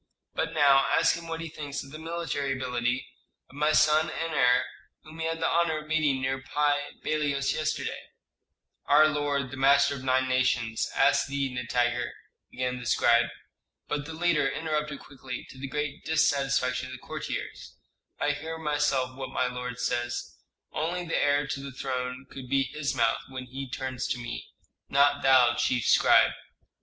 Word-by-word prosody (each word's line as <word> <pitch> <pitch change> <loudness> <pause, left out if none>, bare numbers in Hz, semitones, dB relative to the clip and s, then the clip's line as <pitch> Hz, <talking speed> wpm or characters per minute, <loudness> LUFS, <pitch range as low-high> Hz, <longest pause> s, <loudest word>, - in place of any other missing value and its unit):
But 165 0 -2
now 140 -2 +5
ask - - +4
him 170 0 -8
what 165 0 -4
he 165 - -4
thinks 145 -2 -5
of 135 - -13
the 155 - -8
military 160 -4 -2
ability 125 -1 -1 0.5
of - - -16
my 150 +1 +2
son 155 +1 +4
and 165 0 -3
heir, 125 -3 +4 0.4
whom 155 +1 -12
he 160 - -1
had 165 0 -2
the - - +1
honor 165 -2 +2
of 155 0 -8
meeting 150 -4 +1
near 135 0 -1
Pi 145 +1 0
Bailos 145 -3 0
yesterday." 155 0 -3 0.8
"Our 150 +2 +7
lord, 145 -3 -1
the 130 - -7
master 140 +1 +4
of 135 -2 -7
nine 130 0 +2
nations, 120 -3 +1
asks - - +3
thee, 140 -2 -2
Nitager 120 0 -1 0.2
" - - -56
began 125 0 -2
the 120 - -7
scribe. 120 0 +4 0.6
But 145 -1 -2
the 160 - -7
leader 165 -4 +2
interrupted 150 -1 -3
quickly, 130 -3 -8
to 130 - -13
the 135 - -4
great 150 +1 -4
dissatisfaction 135 -5 +1
of 130 - -9
the - - -6
courtiers, - - -5 0.4
"I 150 - +2
hear 160 +3 -5
myself 145 -4 0
what 130 -1 -6
my 130 - 0
lord 125 -1 -4
says. 120 0 -2 0.4
Only 175 +3 -2
the 165 - -2
heir 145 0 +2
to 135 0 -4
the 140 0 -7
throne 130 0 -4
could 130 -2 -9
be 135 0 +3
his 140 +1 -3
mouth 115 -2 +2
when 130 -1 -6
he 135 +1 -7
turns 130 -1 -3
to - - -1
me; 120 -1 -6 0.4
not 140 +1 +4
thou, 130 -3 +6
chief 125 -2 0
scribe." - - +5
140 Hz, 175 wpm, -28 LUFS, 130-150 Hz, 0.8 s, Our